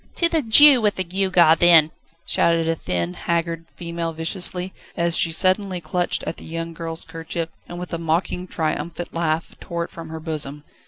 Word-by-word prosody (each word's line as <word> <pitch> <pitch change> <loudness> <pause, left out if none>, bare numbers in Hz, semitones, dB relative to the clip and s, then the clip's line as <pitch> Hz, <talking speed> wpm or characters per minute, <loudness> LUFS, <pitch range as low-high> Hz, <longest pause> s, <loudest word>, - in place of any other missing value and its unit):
"To 340 - +4
the 325 -2 0
Jew 270 +2 +8
with 210 -1 +1
the 185 - -3
gewgaw, 180 -2 +3
then!" 165 -3 +5 0.3
shouted 165 -1 +1
a 165 - +1
thin, 90 - -3
haggard 165 - -3
female 170 -1 -5
viciously, 180 +3 +2 0.2
as 170 -1 +1
she 165 - +2
suddenly 185 +2 +1
clutched 175 +2 -1
at - - -5
the - - -11
young 165 +1 -6
girl's 165 0 -5
kerchief, 165 0 -6 0.2
and 175 - -8
with 180 0 -8
a 170 - -3
mocking, 170 +2 -2
triumphant 170 +1 -4
laugh 165 -1 -2
tore 170 -1 -4
it - - -10
from 165 -1 -10
her 160 0 -7
bosom. 150 -3 -5
170 Hz, 180 wpm, -21 LUFS, 165-180 Hz, 0.3 s, Jew